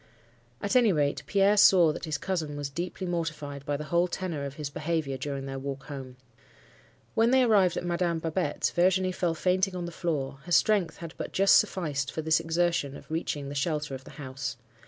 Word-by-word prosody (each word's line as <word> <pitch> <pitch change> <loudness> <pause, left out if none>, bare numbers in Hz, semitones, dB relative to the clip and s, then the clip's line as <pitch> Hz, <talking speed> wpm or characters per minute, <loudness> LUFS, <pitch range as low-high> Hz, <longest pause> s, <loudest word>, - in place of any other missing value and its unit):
"At 205 - 0
any 240 -4 +6
rate, 145 -4 +1
Pierre 200 +1 +3
saw 175 -6 +6
that - - -6
his 155 -2 -2
cousin 155 -5 -3
was 145 -1 -4
deeply 175 +4 -4
mortified 155 -5 -3
by 145 -1 0
the 150 - -5
whole 170 +3 +2
tenor 170 -5 -4
of 140 0 -6
his 150 -1 -4
behaviour 155 -3 -2
during 135 0 -4
their 135 0 -5
walk 135 0 -5
home. 135 -3 -8 1.0
When 225 +1 +3
they 260 0 +5
arrived 200 -7 +4
at - - -3
Madame 175 -1 0
Babette's, 160 -1 -1
Virginie 185 +1 +2
fell 175 -2 -1
fainting 185 +3 +1
on 175 -1 -3
the 170 - -6
floor; 145 -6 -3
her 175 - -9
strength 185 -3 +3
had 170 -1 -8
but - - -5
just 195 +1 +5
sufficed 145 -6 -2
for 160 - -4
this 160 +1 +3
exertion 165 -4 0
of - - -15
reaching 150 -3 -2
the - - -5
shelter 150 0 -1
of 130 0 -6
the - - -11
house. 130 -3 -5
165 Hz, 200 wpm, -28 LUFS, 145-180 Hz, 1.0 s, any